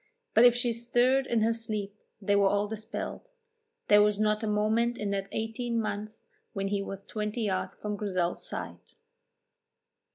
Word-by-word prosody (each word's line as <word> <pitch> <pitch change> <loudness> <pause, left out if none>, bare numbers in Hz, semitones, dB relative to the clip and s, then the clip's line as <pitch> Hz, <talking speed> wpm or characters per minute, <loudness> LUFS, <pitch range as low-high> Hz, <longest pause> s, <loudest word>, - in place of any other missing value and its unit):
But 240 - +7
if 245 -1 +7
she 245 -1 +1
stirred 245 +3 +2
in 225 -2 +2
her 230 +1 +3
sleep 215 -3 -4 0.2
they 205 0 +1
were 200 -1 +5
all 205 +1 +1
dispelled; 220 - -5 0.6
there 205 0 +7
was 210 0 +3
not 215 0 +2
a 220 - -2
moment 220 +3 +1
in 205 -1 -2
that 195 0 -2
eighteen 230 +1 -2
months 215 0 -4 0.4
when 195 -1 -2
he 200 0 0
was 195 0 -6
twenty 210 +3 -3
yards 190 -3 -1
from 210 -1 -4
Grizel's 185 -4 -1
side. - - -5
210 Hz, 165 wpm, -29 LUFS, 205-230 Hz, 0.6 s, But